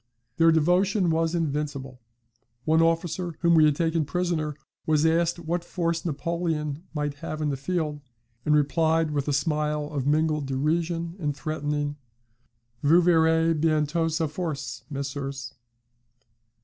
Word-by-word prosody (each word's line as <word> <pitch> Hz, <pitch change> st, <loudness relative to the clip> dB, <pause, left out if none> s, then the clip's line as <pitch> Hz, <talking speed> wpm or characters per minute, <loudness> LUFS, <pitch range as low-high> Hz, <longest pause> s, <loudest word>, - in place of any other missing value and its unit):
Their 165 Hz, 0 st, +6 dB
devotion 180 Hz, +3 st, +3 dB
was 165 Hz, +1 st, +1 dB
invincible. 145 Hz, -5 st, -3 dB, 0.6 s
One 160 Hz, +1 st, +4 dB
officer 165 Hz, +1 st, 0 dB
whom 170 Hz, 0 st, +4 dB
we 160 Hz, -2 st, +6 dB
had 150 Hz, -1 st, +3 dB
taken 165 Hz, 0 st, +1 dB
prisoner 160 Hz, -2 st, -1 dB, 0.3 s
was 155 Hz, 0 st, +3 dB
asked 165 Hz, +1 st, +2 dB
what 170 Hz, +1 st, -2 dB
force 170 Hz, -2 st, -2 dB
Napoleon 160 Hz, -1 st, -2 dB
might 150 Hz, -1 st, -1 dB
have 155 Hz, -2 st, -4 dB
in 150 Hz, -1 st, 0 dB
the 140 Hz, -, -1 dB
field, 150 Hz, 0 st, -2 dB, 0.4 s
and 150 Hz, -1 st, +3 dB
replied 160 Hz, +2 st, +2 dB
with 145 Hz, -1 st, -1 dB
a -, -, +1 dB
smile 150 Hz, 0 st, 0 dB
of 140 Hz, -2 st, -2 dB
mingled 150 Hz, -1 st, +1 dB
derision 165 Hz, +5 st, -1 dB
and 145 Hz, -4 st, -2 dB
threatening, 145 Hz, -2 st, -2 dB, 0.8 s
'Vous 165 Hz, +5 st, +5 dB
verrez 165 Hz, -1 st, +4 dB
bientot 155 Hz, +1 st, +1 dB
sa 160 Hz, +1 st, 0 dB
force, 155 Hz, -2 st, -4 dB
messieurs.' 140 Hz, -2 st, -5 dB
160 Hz, 135 wpm, -26 LUFS, 150-165 Hz, 0.8 s, Their